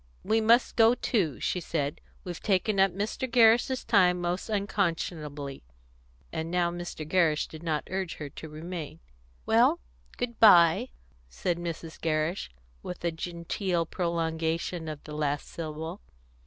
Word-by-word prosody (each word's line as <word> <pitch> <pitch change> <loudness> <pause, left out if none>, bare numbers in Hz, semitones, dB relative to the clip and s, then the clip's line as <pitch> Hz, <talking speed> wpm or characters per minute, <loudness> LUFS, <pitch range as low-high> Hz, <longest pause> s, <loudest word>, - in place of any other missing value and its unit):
"We 220 +1 +2
must 235 +3 +4
go 230 +1 +6
too," 185 - 0
she 180 - 0
said. 150 -4 -3 0.2
"We've 175 -2 -6
taken 195 0 +1
up 195 0 +6
Mr. 210 +7 -3
Gerrish's 240 +2 +4
time 180 -5 +4
most 175 +4 -2
unconscionably," 165 -8 -2 0.7
and 160 +1 -3
now 175 0 +1
Mr. 175 -3 -6
Gerrish 160 -3 +2
did 155 - -10
not 155 -3 -2
urge 190 -2 -3
her 150 - -6
to 155 +3 -9
remain. 160 0 -7 0.5
"Well, - - +4 0.4
good 235 -1 -4
bye," 170 -7 +7 0.4
said 170 - -2
Mrs. 170 -1 -6
Gerrish, 160 +2 -1 0.3
with 180 -1 -7
a 170 - +2
genteel 170 +1 -2
prolongation 165 0 -2
of 155 -2 -6
the 150 - -9
last 145 -1 -1
syllable. 160 +3 -6
170 Hz, 140 wpm, -28 LUFS, 160-195 Hz, 0.7 s, bye